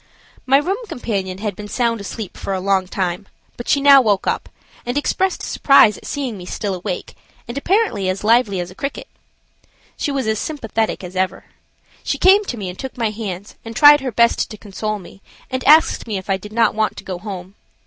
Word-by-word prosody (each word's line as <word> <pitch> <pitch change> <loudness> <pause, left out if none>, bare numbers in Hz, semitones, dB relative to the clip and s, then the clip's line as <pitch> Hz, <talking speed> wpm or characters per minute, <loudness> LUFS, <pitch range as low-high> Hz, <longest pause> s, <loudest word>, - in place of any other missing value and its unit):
My 270 +1 +6
room 385 - -1
companion 195 - -3
had 205 0 -4
been 210 - -8
sound 230 -1 0
asleep 200 0 -7
for 195 - -3
a - - -2
long 190 -1 +1
time, 185 +1 -3 0.3
but 240 - -8
she 280 - +4
now 280 -1 +8
woke 205 -5 +1
up, - - -2 0.3
and 245 +3 -3
expressed 375 +6 0
surprise 230 -7 +5
at - - -11
seeing 260 -8 -4
me 180 - -9
still 200 +1 -3
awake 180 0 -5 0.3
and 235 - -6
apparently 280 - +1
as 185 +2 -3
lively 220 -3 +3
as 175 0 -4
a - - -11
cricket. 275 +8 -5 0.9
She - - -2
was 275 -3 -1
as 220 -1 0
sympathetic 225 -9 -2
as 180 +1 -8
ever. 185 0 -1 0.6
She - - -1
came 390 +3 +5
to 245 - -4
me 200 -3 -5
and 180 0 -8
took 265 -1 -7
my 225 -3 0
hands 205 -3 -6
and 225 0 -8
tried 290 +3 +8
her 260 -2 -3
best 235 +1 +2
to 215 - -9
console 215 +1 -4
me, 195 0 -14 0.3
and 260 0 -2
asked 310 -3 +5
me 210 -3 -2
if 190 +1 -5
I 190 - +2
did 210 +2 -11
not 225 0 +2
want 215 0 -1
to - - -8
go 185 -2 -5
home. 190 -2 -7
215 Hz, 210 wpm, -19 LUFS, 195-260 Hz, 0.9 s, now